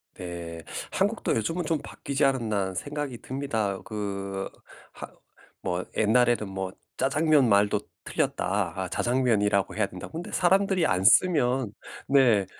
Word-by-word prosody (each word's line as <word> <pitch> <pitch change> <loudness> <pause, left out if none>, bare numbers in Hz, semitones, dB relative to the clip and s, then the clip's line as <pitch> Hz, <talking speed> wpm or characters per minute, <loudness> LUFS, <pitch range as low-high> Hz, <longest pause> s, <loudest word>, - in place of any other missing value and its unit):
네. 85 -2 -7 0.3
'한국도 - - 0
요즘은 165 +10 -1
좀 160 -1 0
바뀌지 140 0 -1
않았나?' 115 -6 +1
하는 95 0 -2
생각이 145 +3 -4
듭니다. 115 -8 -2
그 100 -2 -4 0.4
하 - - -8 0.5
뭐 90 +1 -2
옛날에는 115 0 +3
뭐 95 -1 -4 0.2
"짜장면 145 -1 +3
말도 100 +1 +3 0.2
틀렸다. 95 -1 -1
자장면이라고 105 -7 +1
해야 105 -1 +1
된다."고 90 - -9
근데 165 +2 -6
사람들이 190 -1 +3
안 90 0 +1
쓰면 125 - +4 0.3
네. 125 -8 +4
110 Hz, 280 characters per minute, -27 LUFS, 95-140 Hz, 0.5 s, 쓰면